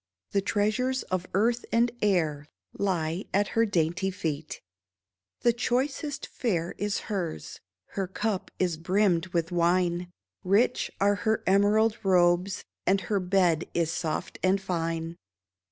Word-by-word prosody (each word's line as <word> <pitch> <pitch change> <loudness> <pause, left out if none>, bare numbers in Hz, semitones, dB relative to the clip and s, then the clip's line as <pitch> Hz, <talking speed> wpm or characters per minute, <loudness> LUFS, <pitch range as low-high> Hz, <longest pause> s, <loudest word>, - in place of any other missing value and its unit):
The 200 - +2
treasures 215 +6 0
of 185 0 -1
earth 235 +4 +2
and 235 +1 +3
air 160 -8 +1 0.3
Lie 175 -2 -1
at 205 +1 +2
her 230 0 +2
dainty 180 0 0
feet; 160 -5 -4 0.8
The 235 - +4
choicest 270 +5 -1
fare 175 -8 -2
is 205 0 -1
hers, 175 - -4 0.3
Her 195 -2 -3
cup 200 +1 -2
is 175 -3 0
brimmed 185 0 +2
with 170 -1 -1
wine; 175 0 +1 0.3
Rich 205 +7 +2
are 205 +1 +3
her 220 -1 +1
emerald 210 +3 +3
robes, 180 0 +2 0.2
And 195 +1 +3
her 200 +3 0
bed 180 -3 +2
is 165 -2 +1
soft 160 -2 -3
and 190 +1 +3
fine. 165 -3 -3
190 Hz, 130 wpm, -27 LUFS, 170-210 Hz, 0.8 s, The